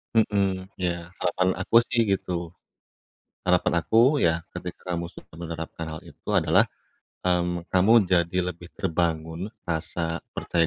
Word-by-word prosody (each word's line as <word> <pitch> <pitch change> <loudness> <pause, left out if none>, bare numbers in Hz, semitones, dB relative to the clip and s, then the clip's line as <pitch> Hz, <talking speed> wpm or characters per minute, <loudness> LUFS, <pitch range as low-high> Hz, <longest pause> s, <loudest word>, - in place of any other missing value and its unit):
Mhm. 100 -3 +1
Iya, 85 0 -2
harapan 90 +1 +2
aku - - -2
sih, 120 - +1
gitu. 85 -3 -1 0.9
Harapan 90 -1 +3
aku, 110 - +1 0.3
ya, 80 0 +3 0.2
ketika 90 -1 -5
kamu 85 0 -3
sudah - - -14
menerapkan 80 -1 -5
hal 80 - -6
itu 80 - -11
adalah, - - +4 0.6
mmm, 90 -1 +1
kamu 95 +4 +4 0.2
jadi 85 0 +2
lebih 85 0 -11
terbangun 80 0 -1 0.2
rasa 80 0 -2 0.2
percaya 85 -1 +1
85 Hz, 130 wpm, -26 LUFS, 85-90 Hz, 0.9 s, adalah